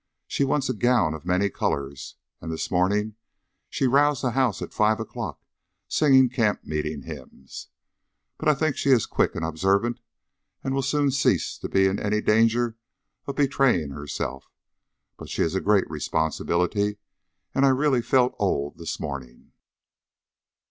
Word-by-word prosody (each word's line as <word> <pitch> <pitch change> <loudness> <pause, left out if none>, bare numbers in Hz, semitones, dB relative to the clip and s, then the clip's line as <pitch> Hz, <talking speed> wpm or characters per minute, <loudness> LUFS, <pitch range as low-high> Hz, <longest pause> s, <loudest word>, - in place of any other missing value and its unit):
She - - -1
wants 135 0 +1
a 130 - 0
gown 115 -8 +2
of 80 +2 -9
many 90 +2 +2
colours, 70 -1 -3 0.3
and 80 - -5
this 80 - -4
morning 105 +4 +1 0.5
she - - -1
roused 140 +2 +3
the 125 - +1
house 125 -4 +1
at - - -8
five 110 +1 +2
o'clock 110 - -6 0.5
singing 135 -4 +5
camp 115 -4 0
meeting 75 -1 -3
hymns. 65 -3 -10 0.7
But - - +1
I 150 - +4
think 155 +1 0
she - - -1
is 125 -5 +5
quick - - 0
and 80 - -2
observant, 95 +8 0 0.6
and 135 - -2
will 135 - +1
soon 140 +1 +1
cease 140 +1 +1
to - - -5
be 95 0 +3
in 95 +1 +1
any 105 +1 0
danger 115 +2 +2 0.5
of 140 - -4
betraying 135 - +2
herself. 70 -2 -5 0.7
But - - -10
she - - 0
is 80 - -1
a 95 - 0
great 105 -1 +3
responsibility, 90 +6 -1 0.6
and 135 - +2
I 135 - +6
really 135 -1 +2
felt 125 +1 +2
old 70 +1 -1
this 85 0 -5
morning." 70 -5 -7
105 Hz, 155 wpm, -25 LUFS, 80-130 Hz, 0.7 s, I